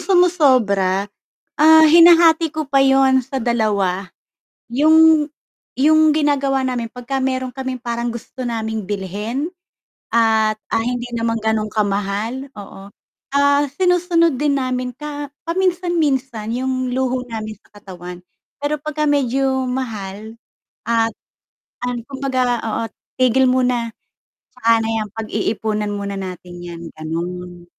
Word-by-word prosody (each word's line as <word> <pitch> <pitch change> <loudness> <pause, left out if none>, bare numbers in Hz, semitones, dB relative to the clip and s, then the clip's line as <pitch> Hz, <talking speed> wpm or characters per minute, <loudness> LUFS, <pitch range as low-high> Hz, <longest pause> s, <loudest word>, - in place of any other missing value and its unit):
sumosobra, 255 - +3 0.5
ah, 315 +1 +7
hinahati 330 -1 +6
ko 310 -2 -4
pa 275 -1 +4
yun 270 -1 +4
sa 265 +1 -4
2. 205 -5 0 0.6
Yung 315 +4 +5 0.5
yung 310 +2 +4
ginagawa 280 -3 +1
namin 245 -3 -2
pagka 250 +2 -4
meron 260 -1 -1
kaming 260 -1 -5
parang 235 -1 -3
gusto 245 +2 -7
naming 220 -2 -3
bilhin 210 - -3 0.6
at, 220 -2 +2
ah, 225 - 0
hindi 245 +1 -2
naman 230 0 -1
ganun 220 -1 -1
kamahal 210 +5 -2
oo, 200 -1 -11 0.4
ah, 285 0 +3 0.2
sinusunod 355 -4 +2
din 285 0 +1
namin 255 -1 -2
ka 290 +2 -7 0.2
paminsan-minsan 325 - 0
yung 255 0 -2
luho 255 0 -1
namin 215 -1 -5
sa - - -29
katawan. 180 -2 -9 0.4
Pero 290 +1 -2
pagka 305 0 -2
medyo 270 -1 +1
mahal 220 -4 -5 0.5
at 230 0 +1 0.7
an 245 -1 -2
kumbaga 260 -3 -1
oo 220 0 -2 0.4
tigil 255 +1 +4
muna, 250 -2 +1 0.6
"Tsaka 230 -2 +2
na 225 - -2
yan, 220 -1 -2
pag-iipunan 215 -1 -2
muna 200 -1 -4
natin 180 -2 -7
yan." 170 -1 -8 0.2
ganun. 175 +2 -5
250 Hz, 120 wpm, -19 LUFS, 215-280 Hz, 0.7 s, ah